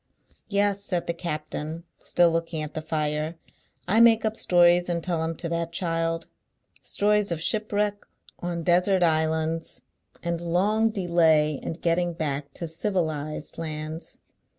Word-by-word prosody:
"Yes," 200 Hz, 0 st, +1 dB
said 180 Hz, -4 st, -2 dB
the 170 Hz, -, -1 dB
captain, 155 Hz, -1 st, -4 dB, 0.2 s
still 175 Hz, -1 st, +3 dB
looking 165 Hz, -1 st, -2 dB
at 150 Hz, 0 st, -7 dB
the 155 Hz, -, -3 dB
fire, 155 Hz, +1 st, -2 dB, 0.5 s
"I 210 Hz, +5 st, +3 dB
make 230 Hz, -1 st, +6 dB
up 220 Hz, 0 st, 0 dB
stories 175 Hz, -2 st, +4 dB
and 170 Hz, -1 st, -1 dB
tell 170 Hz, -3 st, -1 dB
'em 165 Hz, 0 st, -2 dB
to 170 Hz, -, -5 dB
that 170 Hz, 0 st, -2 dB
child. 165 Hz, -1 st, -1 dB, 0.6 s
Stories 210 Hz, -1 st, +1 dB
of 170 Hz, -, -1 dB
shipwreck 210 Hz, +2 st, +1 dB, 0.3 s
on 175 Hz, -1 st, -3 dB
desert 180 Hz, +2 st, +3 dB
islands, 160 Hz, 0 st, 0 dB, 0.4 s
and 170 Hz, -1 st, -2 dB
long 200 Hz, +6 st, +2 dB
delay 165 Hz, -, +2 dB
in -, -, -4 dB
getting 175 Hz, +1 st, 0 dB
back 145 Hz, -3 st, -3 dB
to 170 Hz, -, -4 dB
civilised 160 Hz, -4 st, -3 dB
lauds. 155 Hz, 0 st, -5 dB
170 Hz, 140 wpm, -26 LUFS, 160-180 Hz, 0.6 s, make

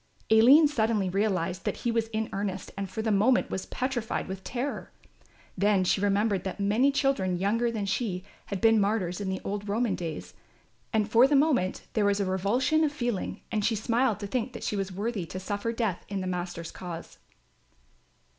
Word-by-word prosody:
Aline 260 Hz, +8 st, +8 dB
suddenly 220 Hz, -8 st, +1 dB
realised 190 Hz, -2 st, 0 dB
that -, -, -2 dB
he 240 Hz, -, +2 dB
was 230 Hz, -1 st, 0 dB
in 220 Hz, 0 st, -2 dB
earnest 195 Hz, -2 st, -3 dB
and 195 Hz, -1 st, -4 dB
for 220 Hz, +4 st, -4 dB
the 220 Hz, -, +1 dB
moment 220 Hz, +6 st, +3 dB
was 190 Hz, -, -3 dB
petrified 250 Hz, -3 st, -2 dB
with 190 Hz, 0 st, -6 dB
terror. 250 Hz, +8 st, -4 dB, 0.6 s
Then 200 Hz, 0 st, +3 dB
she 185 Hz, -, +1 dB
remembered 200 Hz, -1 st, +1 dB
that 190 Hz, +1 st, -5 dB
many 215 Hz, +8 st, +3 dB
children 270 Hz, -11 st, +1 dB
younger 220 Hz, +6 st, +1 dB
than 220 Hz, -3 st, -3 dB
she 195 Hz, -2 st, -2 dB, 0.2 s
had 200 Hz, -3 st, -4 dB
been 225 Hz, -1 st, +5 dB
martyrs 195 Hz, -3 st, 0 dB
in 195 Hz, -, -2 dB
the 190 Hz, -, -2 dB
old 205 Hz, +1 st, -4 dB
Roman 220 Hz, 0 st, +1 dB
days, 170 Hz, -4 st, -5 dB, 0.6 s
and 215 Hz, -2 st, +1 dB
for 235 Hz, +4 st, +6 dB
the 290 Hz, -, +2 dB
moment 270 Hz, -10 st, +2 dB
there 215 Hz, -2 st, +2 dB
was 200 Hz, 0 st, +2 dB
a 200 Hz, -, +1 dB
revulsion 210 Hz, -, +1 dB
of 300 Hz, -, +2 dB
feeling 240 Hz, -8 st, -3 dB
and 215 Hz, -2 st, 0 dB
she 225 Hz, +2 st, +2 dB
smiled 230 Hz, +1 st, +1 dB
to -, -, -3 dB
think 245 Hz, +4 st, -2 dB
that 235 Hz, -, -7 dB
she -, -, -1 dB
was 195 Hz, -1 st, -2 dB
worthy 200 Hz, -1 st, -3 dB
to 185 Hz, -, -6 dB
suffer 205 Hz, +4 st, -2 dB
death 225 Hz, -6 st, -2 dB
in 200 Hz, -1 st, -2 dB
the 185 Hz, -, -3 dB
Master's 175 Hz, -2 st, -4 dB
cause. 170 Hz, -2 st, -8 dB
205 Hz, 195 wpm, -28 LUFS, 190-230 Hz, 0.6 s, Aline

